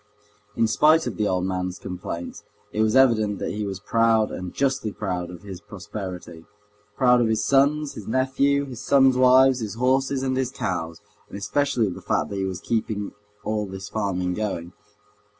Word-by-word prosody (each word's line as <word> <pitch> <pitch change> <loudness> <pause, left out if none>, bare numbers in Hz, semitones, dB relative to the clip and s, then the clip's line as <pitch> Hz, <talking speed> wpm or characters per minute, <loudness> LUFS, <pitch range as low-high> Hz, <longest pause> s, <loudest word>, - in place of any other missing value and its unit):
In 115 - +3
spite 155 +8 +4
of - - -3
the 105 - +1
old 90 -1 0
man's 90 -1 -2
complaints, 90 -1 -6 0.3
it 110 - -1
was 110 +2 +2
evident 110 -6 +4
that - - -3
he 105 0 -3
was 95 -1 -5
proud, 115 +1 +2
and 90 -1 -6
justly 135 -5 -1
proud, 90 -4 -3
of 90 0 -11
his 95 -3 -8
prosperity, 95 -4 -8 0.5
proud 125 -2 +5
of 115 - +2
his 110 -1 0
sons, 140 +2 +2
his 105 - -9
nephew, 140 +3 +1
his 125 -3 -8
sons' 135 -2 +4
wives, 130 0 +5
his 110 -3 -5
horses 130 +2 +1
and 130 -1 0
his 130 -1 0
cows, 85 -10 -4 0.3
and - - -7
especially 115 +4 0
of 95 - -2
the - - -10
fact - - -1
that 100 - -4
he 95 - -1
was 95 -1 -4
keeping 110 -3 -2 0.3
all 105 -1 -2
this 95 +1 -8
farming 95 -4 -1
going. 90 -4 -4
110 Hz, 185 wpm, -24 LUFS, 95-130 Hz, 0.5 s, proud